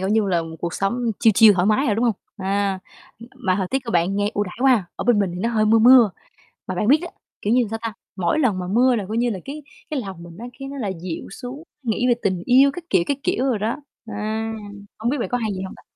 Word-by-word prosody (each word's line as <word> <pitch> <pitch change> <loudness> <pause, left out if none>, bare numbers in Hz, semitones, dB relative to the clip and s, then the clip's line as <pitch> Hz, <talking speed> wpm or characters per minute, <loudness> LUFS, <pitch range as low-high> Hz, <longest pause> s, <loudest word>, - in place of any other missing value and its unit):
kiểu, 190 - -1
như 215 -1 +2
là 170 -2 +1
một 160 0 -8
cuộc 170 0 -3
sống 235 +4 -1
chill 225 - +5
chill 215 -1 +7
thoải 180 0 +1
mái 220 +7 +2
rồi, 210 - +2
đúng 230 +3 0
hông? 230 - +3 0.2
À, 195 0 -1 0.4
ừm, 230 - -12
mà 190 -8 0
thời 190 - -1
tiết 270 - +1
các 230 - -4
bạn 175 +3 +1
nghe 205 +1 0
ưu 205 - +1
đãi 180 - -9
quá 270 +1 +5
ha, 200 - -3
ở - - -4
bên 235 -3 +4
mình 195 -3 +1
thì 180 - -5
nó 230 - 0
hơi 220 -2 +1
mưa 225 +1 +5
mưa. 240 -1 +7 0.6
Mà 185 - -3
bạn 210 +4 -1
biết 290 +4 +6
đó, 350 - -5 0.3
kiểu 210 - +1
như, 250 - +4
làm 220 - -3
sao 225 - -3
ta, 230 - -3 0.2
mỗi 185 - 0
lần 235 -11 +2
mà 180 - -4
mưa 245 +4 +3
là 210 - -2
coi 220 - -3
như 240 +1 +1
là 200 - -3
cái 295 +2 -7 0.3
cái 290 -4 -1
lòng 190 -5 -8
mình 170 0 -11 0.2
cái 270 0 -6
nó 280 - -7
lại 205 -7 -2
dịu 175 -3 -5
xuống, 250 +8 -8 0.2
nghĩ 235 0 0
về 240 - +5
tình 185 -3 0
yêu 265 +3 +6
các 350 +2 -8
kiểu, 170 - +4
các 280 - 0
kiểu 360 -7 0
rồi 250 -6 +1
đó, 220 +3 -1 0.3
ờ, 220 - -7 0.8
hông 230 +2 0
biết 285 - -1
bạn - - -2
có 245 - 0
hay 220 -3 -2
vậy 185 - -5
hông 190 - -7
ta? - - -17
220 Hz, 295 wpm, -22 LUFS, 190-245 Hz, 0.8 s, chill